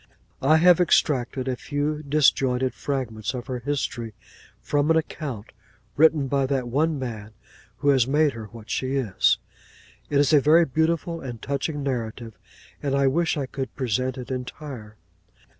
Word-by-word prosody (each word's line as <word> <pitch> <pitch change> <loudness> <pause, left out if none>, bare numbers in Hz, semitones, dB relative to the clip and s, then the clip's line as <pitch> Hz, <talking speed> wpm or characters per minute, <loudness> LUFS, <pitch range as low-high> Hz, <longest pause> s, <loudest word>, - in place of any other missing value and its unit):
I 155 +4 +5
have 175 +1 +6
extracted 135 -6 +1
a 130 - 0
few 145 +3 -2
disjointed 135 -3 +2
fragments 125 -5 -3
of 125 -1 -5
her 130 -2 -4
history, 120 -4 -3 0.4
from 145 +1 0
an 165 - +5
account, 140 -8 -4 0.4
written 155 -1 +4
by 135 0 +1
that 130 -2 -1
one 150 +5 +1
man 110 -5 -6 0.4
who 145 - +1
has 130 -4 +4
made 150 +1 +3
her 115 -1 -7
what 115 0 -13
she 130 +1 -1
is. 120 -8 +2 0.7
It 145 - +1
is 145 +1 +3
a 145 - +6
very 160 +4 +5
beautiful 165 +3 -1
and 120 -4 -7
touching 140 +2 -3
narrative; 115 -4 -4 0.5
and 140 -1 -1
I 140 0 +2
wish 160 +5 +1
I 140 - -1
could 130 0 -6
present 130 +1 -1
it 125 0 -7
entire. 125 -3 -7
135 Hz, 160 wpm, -24 LUFS, 125-150 Hz, 0.7 s, have